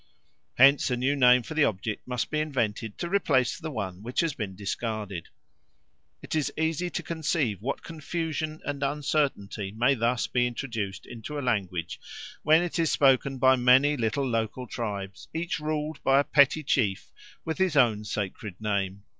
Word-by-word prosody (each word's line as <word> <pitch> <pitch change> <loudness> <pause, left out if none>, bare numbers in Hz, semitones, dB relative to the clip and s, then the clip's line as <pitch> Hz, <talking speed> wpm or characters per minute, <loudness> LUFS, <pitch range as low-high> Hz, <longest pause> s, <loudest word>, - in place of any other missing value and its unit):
Hence 135 +2 +6
a 125 - 0
new 135 +3 +1
name 125 -2 +5
for 160 - -7
the 155 -1 +4
object 105 +1 -3
must 125 -1 -2
be 155 - 0
invented 115 -7 -2
to 170 - -3
replace 145 -10 +1
the 160 -2 -5
one 100 -9 -5
which 120 +4 -1
has 165 -3 0
been 105 -7 -5
discarded. 100 -2 -4 1.0
It - - -6
is 155 -2 0
easy 160 +2 0
to - - -4
conceive 150 - -1
what 135 +5 -3
confusion 160 -1 -4
and 145 -1 -3
uncertainty 140 -8 -1
may 120 +6 +2
thus 120 0 0
be 125 -1 +1
introduced 115 -5 -4
into 120 +5 -7
a - - -2
language 90 -8 -2 0.4
when 160 +3 +5
it 175 0 -3
is 165 -2 +2
spoken 135 -1 +3
by 130 +1 +5
many 130 +4 +5
little 130 +2 -1
local 115 +1 -2
tribes 100 -5 -5
each 165 0 -2
ruled 150 0 -3
by 135 +1 +5
a - - +3
petty 145 +2 +4
chief 110 -9 0 0.3
with 160 +3 -3
his 185 -5 +2
own 110 -6 +4
sacred 105 -1 -5
name. 100 -2 -2
130 Hz, 170 wpm, -27 LUFS, 110-150 Hz, 1.0 s, Hence